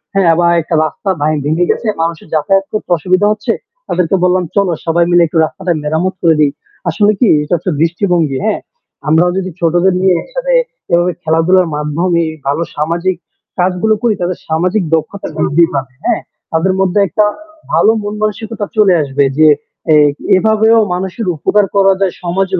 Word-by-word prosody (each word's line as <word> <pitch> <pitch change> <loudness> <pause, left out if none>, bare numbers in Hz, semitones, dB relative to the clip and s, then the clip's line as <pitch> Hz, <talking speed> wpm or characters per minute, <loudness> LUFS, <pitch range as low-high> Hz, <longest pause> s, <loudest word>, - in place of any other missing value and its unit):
হ্যাঁ? 180 -4 +4
বা 170 - +3
একটা 160 - -3
রাস্তা 195 +5 -5
ভ্যা 150 - +2 0.2
ভেঙে 165 +4 +1
গেছে। 230 - -3
মানুষের 165 -1 -3
যাতায়াত 195 +5 +1
করতে 215 - -4
অসুবিধা 185 +6 +1
হচ্ছে। 215 - -2 0.4
তাদেরকে 180 +1 0
বললাম 180 0 +2
চলো 200 -3 +2
সবাই 170 +1 +2
মিলে 175 0 +5
একটু 165 - -3
রাস্তাটা 175 +2 -3
মেরামত 160 +5 -1
করে 165 -2 +4
দি। 145 - +5 0.4
আসলে 205 +5 +2
কি 240 - +3 0.2
এটা 155 - -3
হচ্ছে 180 +3 -3
দৃষ্টিভঙ্গি, 170 -4 0
হ্যাঁ? 220 - 0 0.5
আমরাও 170 +3 +3
যদি 185 -1 -2
ছোটদের 175 +2 +2
নিয়ে 190 -2 +3
একসাথে - - -2 0.4
এভাবে 175 +1 +3
খেলাধুলার 165 +3 +2
মাধ্যমে 165 +4 0 0.2
ভালো 150 +4 0
সামাজিক 170 +4 -1 0.4
কাজগুলো 185 +4 +1
করি 230 -3 +3
তাদের 175 0 -2
সামাজিক 180 +5 0
দক্ষতা 195 +5 -4
বৃদ্ধি 165 +4 +3
পাবে 135 -2 -3
হ্যাঁ, - - +1 0.3
তাদের 170 +4 +1
মধ্যে 195 +1 +1
একটা 210 +2 +1 0.5
ভালো 220 - +4
মন 205 0 -4
মানসিকতা 215 0 -3
চলে 200 -4 +5
আসবে 140 0 0 0.2
যে 155 - +6 0.5
এ - - +6 0.4
এভাবেও 220 +2 +3
মানুষের 190 +3 -4
উপকার 205 +7 +2
করা 195 -1 +4
যায়, 190 -2 0
সমাজের 185 +1 -1
180 Hz, 165 wpm, -14 LUFS, 165-195 Hz, 0.5 s, যে